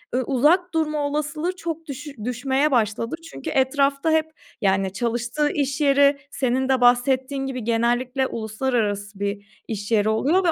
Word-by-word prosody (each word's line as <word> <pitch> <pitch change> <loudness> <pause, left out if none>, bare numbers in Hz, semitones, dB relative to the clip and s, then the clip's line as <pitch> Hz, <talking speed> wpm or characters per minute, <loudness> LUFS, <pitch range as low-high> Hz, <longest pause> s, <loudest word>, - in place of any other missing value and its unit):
ııı, 260 - +1
uzak 320 +8 +3
durma 305 -2 0
olasılığı 300 +4 -2
çok 330 -3 -5
düşü 290 +1 -7
düşmeye 265 +4 0
başladı. 230 +2 0 0.2
Çünkü - - -6
etrafta 275 +3 +1
hep, 315 0 +1 0.3
yani, 195 -1 +1
çalıştığı 240 +6 -1
iş 275 -1 -1
yeri, 280 0 +4
senin 260 0 0
de 260 -1 +2
bahsettiğin 260 +2 +2
gibi, 255 -3 -4
genellikle 240 +3 +1
uluslararası 215 -3 -2
bir 200 +1 -5
iş 205 -1 -5
yeri 215 -1 +3
oluyor 290 +13 +2
ve 345 - +3
265 Hz, 150 wpm, -23 LUFS, 230-290 Hz, 0.3 s, yeri